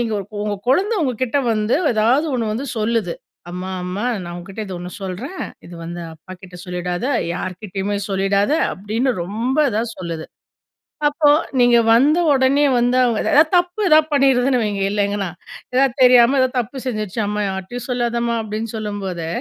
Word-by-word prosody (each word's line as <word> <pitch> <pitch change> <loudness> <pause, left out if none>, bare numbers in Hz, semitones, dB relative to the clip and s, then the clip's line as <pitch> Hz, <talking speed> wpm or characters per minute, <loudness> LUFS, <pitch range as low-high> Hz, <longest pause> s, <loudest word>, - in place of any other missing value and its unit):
நீங்க 230 -2 -1
உங்க 195 - -10 0.2
உங்க 205 -1 -2
குழந்தை 400 +10 +2
உங்ககிட்ட 255 0 0
வந்து, 215 +1 0 0.2
ஏதாவது 240 +9 +3
ஒண்ணு 230 -3 -1
வந்து 250 +6 -4
சொல்லுது. 215 -5 0 0.4
"அம்மா, 185 +1 -5
அம்மா, 185 +5 -3 0.2
நான் 175 0 -7
உன்கிட்ட 195 +5 -8
இது 190 - -6
ஒண்ணு 180 +1 -7
சொல்றேன். 215 - -5 0.2
இது 175 - -11
வந்து 175 +1 -6
அப்பாகிட்ட 180 +2 -12
சொல்லிடாத, 180 +4 -3 0.3
யார்கிட்டயுமே 195 +2 -4
சொல்லிடாத", 195 +4 +1 0.2
அப்படின்னு 220 +7 -1
ரொம்ப 230 - -2
இதா 220 +2 0 0.2
சொல்லுது. 165 -3 -5 0.8
அப்போ 295 0 +3 0.3
நீங்க 245 -1 +5 0.2
வந்தவொடனே 285 0 +4
வந்து, 245 +1 +2
அவங்க 235 -3 +1
ஏதாவது 305 +2 +4
தப்பு 355 +4 -1
ஏதாவது 310 0 +5
பண்ணிருதுன்னு 265 -2 +3
வைங்க, 205 -2 -2
இல்ல 205 - -2
எங்கன்னா. 200 -2 -2 0.4
ஏதாவது 265 -1 +3
தெரியாம, 250 +1 +6
ஏதாவது 260 0 +1
தப்பு 245 +4 -5
செஞ்சுருச்சு, 215 -3 -3
"அம்மா, 210 0 -2
யார்ட்டயும் 190 +7 -6
சொல்லாதம்மா" 235 -1 0
அப்படின்னு 215 +1 -4
சொல்லும்போது, 200 -6 -4
220 Hz, 150 wpm, -20 LUFS, 195-255 Hz, 0.8 s, தெரியாம